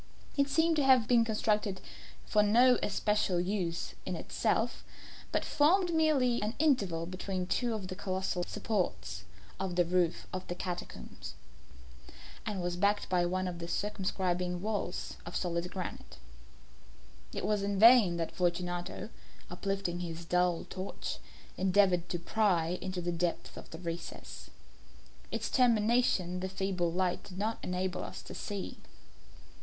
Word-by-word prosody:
It 280 Hz, -1 st, +2 dB
seemed 320 Hz, +3 st, +3 dB
to 290 Hz, -, +3 dB
have 260 Hz, -4 st, +5 dB
been 240 Hz, -2 st, +5 dB
constructed 210 Hz, -3 st, 0 dB, 0.5 s
for 210 Hz, -, +3 dB
no 240 Hz, +4 st, +5 dB
especial 205 Hz, -4 st, +1 dB
use 180 Hz, -2 st, -2 dB
within -, -, -3 dB
itself, -, -, 0 dB, 0.5 s
but -, -, 0 dB
formed 345 Hz, +4 st, +3 dB
merely 285 Hz, -7 st, +3 dB
the 215 Hz, +2 st, -2 dB
interval 200 Hz, -, +2 dB
between 185 Hz, +1 st, -3 dB
two 235 Hz, +5 st, 0 dB
of 200 Hz, -4 st, -5 dB
the 185 Hz, -, -4 dB
colossal 190 Hz, -2 st, -2 dB
supports 95 Hz, -, -2 dB, 0.3 s
of 190 Hz, -2 st, -2 dB
the 175 Hz, -1 st, +4 dB
roof 175 Hz, -1 st, +1 dB
of 185 Hz, 0 st, -4 dB
the 175 Hz, -, -3 dB
catacombs, 180 Hz, -1 st, -6 dB, 1.1 s
and 200 Hz, -4 st, -2 dB
was 175 Hz, 0 st, -2 dB
backed 205 Hz, +2 st, +2 dB
by 175 Hz, -1 st, +2 dB
one 185 Hz, +1 st, -1 dB
of 175 Hz, -2 st, -5 dB
their 170 Hz, -, -5 dB
circumscribing 180 Hz, -2 st, -1 dB
walls 205 Hz, -4 st, -3 dB
of 175 Hz, -, -8 dB
solid 175 Hz, 0 st, -1 dB
granite. 185 Hz, -1 st, -6 dB, 1.1 s
It -, -, -4 dB
was 210 Hz, -1 st, +1 dB
in 200 Hz, 0 st, -1 dB
vain 220 Hz, -5 st, +7 dB
that 165 Hz, -1 st, -2 dB
Fortunato, 175 Hz, +2 st, -1 dB, 0.4 s
uplifting 185 Hz, -1 st, -2 dB
his 170 Hz, -1 st, -5 dB
dull 180 Hz, 0 st, +2 dB
torch, 190 Hz, +1 st, -5 dB, 0.4 s
endeavoured 185 Hz, -2 st, +3 dB
to 175 Hz, -, -1 dB
pry 180 Hz, -2 st, +1 dB
into 185 Hz, -1 st, -3 dB
the 175 Hz, 0 st, -1 dB
depth 170 Hz, 0 st, -2 dB
of -, -, -10 dB
the 160 Hz, -, -8 dB
recess. 170 Hz, 0 st, -7 dB, 0.8 s
Its -, -, -2 dB
termination 225 Hz, -6 st, +3 dB
the 190 Hz, +1 st, -3 dB
feeble 185 Hz, -3 st, -1 dB
light 180 Hz, +1 st, 0 dB
did 185 Hz, -, -10 dB
not 220 Hz, +3 st, -1 dB
enable 180 Hz, 0 st, -2 dB
us -, -, -7 dB
to -, -, -9 dB
see. 200 Hz, -2 st, -5 dB
185 Hz, 145 wpm, -32 LUFS, 175-215 Hz, 1.1 s, vain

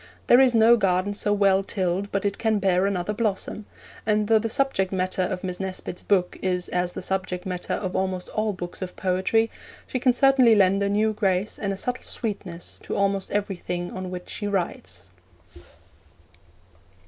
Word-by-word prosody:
There 245 Hz, -, +6 dB
is 260 Hz, -3 st, +5 dB
no 225 Hz, +1 st, +6 dB
garden 190 Hz, -1 st, +1 dB
so 205 Hz, 0 st, -1 dB
well 195 Hz, -1 st, +3 dB
tilled 190 Hz, +1 st, -2 dB
but 195 Hz, 0 st, -1 dB
it 200 Hz, 0 st, -1 dB
can 220 Hz, -2 st, +2 dB
bear 190 Hz, -1 st, +2 dB
another 200 Hz, +1 st, -1 dB
blossom, 210 Hz, -1 st, -2 dB, 0.4 s
and 210 Hz, -1 st, +1 dB
though 225 Hz, 0 st, +5 dB
the 225 Hz, +1 st, -2 dB
subject 225 Hz, -7 st, 0 dB
matter 185 Hz, 0 st, -1 dB
of 185 Hz, 0 st, -2 dB
Miss 180 Hz, -1 st, -3 dB
Nesbit's 185 Hz, -2 st, -5 dB
book 185 Hz, -3 st, +1 dB
is 180 Hz, -1 st, -1 dB
as 180 Hz, 0 st, -1 dB
the -, -, -5 dB
subject 185 Hz, -1 st, -2 dB
matter 180 Hz, -1 st, -3 dB
of 185 Hz, -2 st, -4 dB
almost 185 Hz, -1 st, -1 dB
all 215 Hz, 0 st, -1 dB
books 180 Hz, -2 st, -7 dB
of 180 Hz, -1 st, -5 dB
poetry, 190 Hz, +5 st, +1 dB, 0.3 s
she 255 Hz, -, -3 dB
can 250 Hz, +1 st, +4 dB
certainly 255 Hz, -2 st, +5 dB
lend 195 Hz, -1 st, +4 dB
a 200 Hz, -, +1 dB
new 215 Hz, +2 st, +2 dB
grace 195 Hz, -1 st, 0 dB
and 200 Hz, -2 st, -1 dB
a 195 Hz, -, -3 dB
subtle 250 Hz, +5 st, -2 dB
sweetness 195 Hz, -7 st, -4 dB
to -, -, -5 dB
almost 195 Hz, -1 st, 0 dB
everything 180 Hz, -3 st, -3 dB
on 185 Hz, -1 st, -5 dB
which 180 Hz, -1 st, -7 dB
she 205 Hz, -, -4 dB
writes. 175 Hz, -, -3 dB
195 Hz, 180 wpm, -25 LUFS, 185-215 Hz, 0.4 s, There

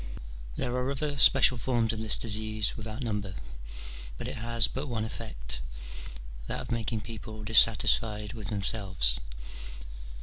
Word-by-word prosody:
There 125 Hz, -, -1 dB
are 125 Hz, +1 st, 0 dB
other 145 Hz, +1 st, -2 dB
special 130 Hz, -3 st, +6 dB
forms 115 Hz, -2 st, +1 dB
of 110 Hz, -, -4 dB
this 110 Hz, -1 st, +3 dB
disease 110 Hz, -1 st, +1 dB
without 110 Hz, +3 st, -6 dB
number, 105 Hz, -5 st, -3 dB, 0.8 s
but -, -, -5 dB
it -, -, -5 dB
has 115 Hz, -1 st, +3 dB
but 135 Hz, +6 st, -4 dB
one 110 Hz, -4 st, -2 dB
effect, -, -, -6 dB, 0.9 s
that -, -, -1 dB
of -, -, -7 dB
making 115 Hz, -1 st, -1 dB
people 110 Hz, 0 st, -8 dB
dissatisfied 105 Hz, -1 st, +4 dB
with 110 Hz, -4 st, -7 dB
themselves. 95 Hz, -, +1 dB
110 Hz, 135 wpm, -29 LUFS, 105-115 Hz, 0.9 s, special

